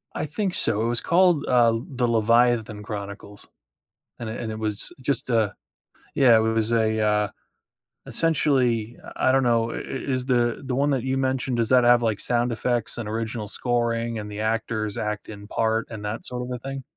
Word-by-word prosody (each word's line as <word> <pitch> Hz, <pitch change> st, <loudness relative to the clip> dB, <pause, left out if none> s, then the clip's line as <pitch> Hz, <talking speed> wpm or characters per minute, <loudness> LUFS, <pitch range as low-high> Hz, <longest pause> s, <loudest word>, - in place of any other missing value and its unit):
I -, -, -2 dB
think 185 Hz, +5 st, -2 dB
so, 105 Hz, 0 st, +2 dB
it -, -, 0 dB
was 120 Hz, 0 st, -1 dB
called, 175 Hz, -4 st, +3 dB
uh, 115 Hz, -2 st, +4 dB
the 125 Hz, -3 st, -1 dB
Leviathan 115 Hz, -1 st, +2 dB
Chronicles. 100 Hz, -1 st, -7 dB, 0.7 s
And 115 Hz, -, -4 dB
it 110 Hz, -, -5 dB
and 110 Hz, -, -4 dB
it 110 Hz, -, -6 dB
was 110 Hz, -1 st, -3 dB
just 130 Hz, 0 st, -1 dB
a 110 Hz, -3 st, +2 dB, 0.6 s
yeah, 125 Hz, -4 st, +6 dB
it -, -, +4 dB
was 110 Hz, 0 st, 0 dB
a, 110 Hz, -1 st, +2 dB
uh, 105 Hz, -1 st, +2 dB, 0.8 s
essentially, 125 Hz, -8 st, +1 dB
uh, -, -, -10 dB
I 130 Hz, -, +3 dB
don't 135 Hz, 0 st, +3 dB
know, 115 Hz, -1 st, +2 dB
i -, -, -4 dB
is 130 Hz, -1 st, -3 dB
the 120 Hz, -3 st, +1 dB
the 130 Hz, -1 st, -2 dB
one 140 Hz, +3 st, +2 dB
that 135 Hz, -4 st, 0 dB
you 130 Hz, +1 st, -1 dB
mentioned, 130 Hz, -1 st, -1 dB
does 115 Hz, -1 st, +1 dB
that 125 Hz, -1 st, +5 dB
have 120 Hz, 0 st, +5 dB
like 110 Hz, -3 st, 0 dB
sound 120 Hz, 0 st, 0 dB
effects 120 Hz, +1 st, -1 dB
and 115 Hz, -3 st, -4 dB
original 110 Hz, -1 st, -3 dB
scoring 115 Hz, 0 st, -1 dB
and 105 Hz, -1 st, -6 dB
the 105 Hz, 0 st, -6 dB
actors 110 Hz, -1 st, -1 dB
act 105 Hz, -1 st, -3 dB
in 105 Hz, -1 st, -9 dB
part 110 Hz, +1 st, 0 dB
and 110 Hz, -3 st, -7 dB
that 105 Hz, +2 st, -4 dB
sort 125 Hz, 0 st, -4 dB
of 125 Hz, -, -6 dB
a 125 Hz, -, -3 dB
thing? 135 Hz, +2 st, -6 dB
115 Hz, 200 wpm, -24 LUFS, 110-125 Hz, 0.8 s, yeah